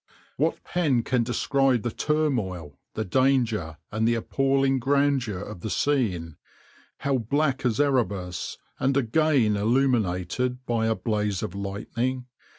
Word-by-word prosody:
"What - - 0
pen 145 -10 +1
can 125 0 +1
describe 130 +1 +1
the 120 - -1
turmoil, 105 - -1 0.2
the 110 - -2
danger, 115 - +1
and 110 +1 +1
the 120 - +3
appalling 135 +3 +1
grandeur 135 -5 +1
of 100 0 -7
the 110 - -5
scene, 95 - 0 0.6
how 135 -1 +1
black 140 +4 0
as 115 0 -1
Erebus, 100 -11 0 0.2
and 135 +1 +2
again 135 -3 +2
illumined 120 +1 0
by 115 -2 0
a 110 - +2
blaze 105 -1 -1
of - - -4
lightning? 115 +6 -3
120 Hz, 130 wpm, -26 LUFS, 105-135 Hz, 0.6 s, the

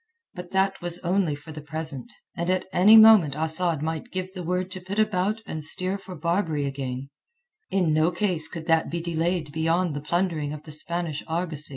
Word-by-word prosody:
But 180 -3 -8
that 195 +1 0
was 175 0 0
only 180 -3 +1
for 150 +2 -12
the 155 0 -8
present, 155 -3 -7 0.2
and 170 +1 -2
at 185 0 0
any 210 +5 +7
moment 215 -10 +7
Asad 160 0 0
might 160 +9 -4
give 185 0 -4
the 185 - -6
word 180 +2 -2
to 185 0 -7
put 190 +3 -6
about 215 0 0
and 155 -1 -5
steer 185 +5 +1
for 190 -1 -10
Barbary 165 -2 -1
again; 135 -1 -5 0.6
in 180 -5 +1
no 155 +2 +3
case 175 -3 +3
could 160 0 -7
that 160 -1 +2
be 170 - -3
delayed 165 -1 -2
beyond 165 +1 0
the 145 - -4
plundering 160 -2 -1
of 150 0 -9
the 155 - -11
Spanish 160 0 -2
argosy. 160 -2 -2
170 Hz, 195 wpm, -25 LUFS, 155-185 Hz, 0.6 s, any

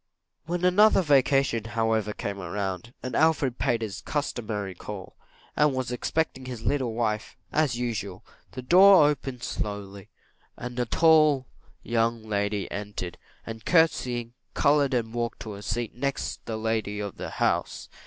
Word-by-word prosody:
When 175 +1 -1
another 195 +2 +5
vacation, 135 -5 +3
however, 110 -2 0
came 100 -1 -5
round, 95 +4 -4
and 130 -2 -4
Alfred 150 -6 +2
paid 120 -2 +1
his 100 -2 -5
customary 110 -9 -3
call, 95 +2 -8 0.4
and 150 -2 +3
was 130 -2 -2
expecting 130 +1 -2
his 125 -3 -7
little 130 -6 0
wife, 110 -2 -2
as 150 -6 +1
usual, 105 -6 -4 0.3
the 130 - -6
door 180 +2 +7
opened 135 -4 -3
slowly, 100 -2 -5 0.5
and 125 0 -6
a 120 - 0
tall 155 -3 +4 0.4
young 115 -1 0
lady 100 -1 -1
entered, 100 -3 -5 0.3
and, 110 -1 -7
courtseying, 125 -8 +2 0.2
coloured 145 -2 +3
and 115 -2 -1
walked 120 0 -3
to 110 - -6
a 100 - -9
seat 110 +2 -3
next 140 +2 -3
the 110 - -3
lady 110 -2 -1
of 100 -2 -5
the - - -5
house. - - -1
120 Hz, 145 wpm, -26 LUFS, 105-140 Hz, 0.5 s, door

